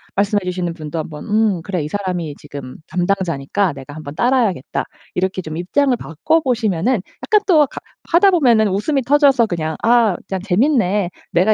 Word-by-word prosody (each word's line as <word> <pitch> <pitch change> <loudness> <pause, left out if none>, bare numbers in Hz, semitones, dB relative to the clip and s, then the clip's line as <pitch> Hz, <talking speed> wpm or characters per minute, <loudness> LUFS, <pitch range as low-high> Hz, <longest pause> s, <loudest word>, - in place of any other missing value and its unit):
말씀해 205 +1 +2
주시는 180 -2 -2
분도 155 0 -5
한번 150 -1 -6
'음 210 -4 +1
그래 180 -3 -2
이 - - -3
사람이 180 -6 -3
지금 140 -3 -9
담당자니까 180 -1 0
내가 135 +1 -10
한번 150 -2 -8
따라야겠다.' 235 - 0 0.3
이렇게 185 +1 -1
좀 160 -2 -6
입장을 255 +9 +1
바꿔 235 - 0
보시면은 235 - 0 0.2
약간 425 -1 +4
또 310 -5 +5
가 - - -9 0.3
하다 355 +4 +6
보면은 240 - +4
웃음이 270 +9 0
터져서 270 -3 +4
그냥 160 -3 -3
'아 230 -4 +4
그냥 190 - -2
재밌네. 205 - +2 0.2
내가 185 +6 +4
195 Hz, 370 characters per minute, -19 LUFS, 170-245 Hz, 0.3 s, 하다